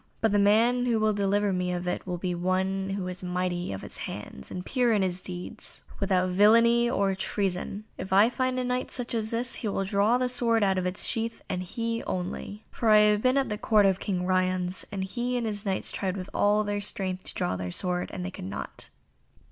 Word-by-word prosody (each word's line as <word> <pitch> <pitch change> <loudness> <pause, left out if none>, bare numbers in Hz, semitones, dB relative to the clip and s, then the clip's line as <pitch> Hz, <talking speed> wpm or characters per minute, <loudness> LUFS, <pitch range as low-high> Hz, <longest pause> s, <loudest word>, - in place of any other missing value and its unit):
But 225 - +2
the 205 - +3
man 230 +5 +4
who 230 -2 +2
will 215 0 +2
deliver 200 0 +1
me 180 0 -1
of 180 0 -3
it 180 - -3
must 175 -1 -3
be 180 -1 0
one 190 +2 0
who 195 -1 -3
is 180 0 -6
mighty 180 - -2
of 95 - -6
his - - -7
hands, 65 - -7
and 180 0 -6
pure 250 -3 +2
in 205 -3 +2
his 185 -1 -1
deeds, 180 -1 -8 0.2
without 185 -2 +1
villainy, 230 +5 +5
or 200 -5 +1
treason. 195 +1 -2 0.2
If 190 - -6
I 200 +3 +6
find 255 +1 -1
a 255 - 0
Knight 250 0 -1
such 245 -1 -4
as 220 -1 -1
this, 235 +2 -1
he 225 - -2
will 195 -1 -1
draw 205 +4 +3
this 250 0 0
sword 230 -3 +2
out 190 -1 +2
of 180 - -1
its 180 - -1
sheath, 230 0 -2
and 185 -1 -2
he 230 +5 -3
only. 185 +3 -4
For 230 - 0
I 215 - +8
have 210 0 +5
been 255 +2 +3
at 270 -3 +1
the 210 -1 -3
Court 215 -2 +4
of 190 -1 +3
King 180 -3 -2
Ryons, 185 0 0
and 195 -2 -3
he 245 +6 -2
and 240 - -1
his 205 -2 -3
Knights 190 - +1
tried 190 -1 -2
with 185 0 -7
all 210 +1 +3
their 205 0 -2
strength 190 -2 -3
to - - -6
draw 180 - -1
the 90 -1 -4
sword 180 - -1
and 180 - -5
they 185 - -4
could 135 - -8
not." 100 +1 -5
200 Hz, 230 wpm, -27 LUFS, 185-225 Hz, 0.2 s, I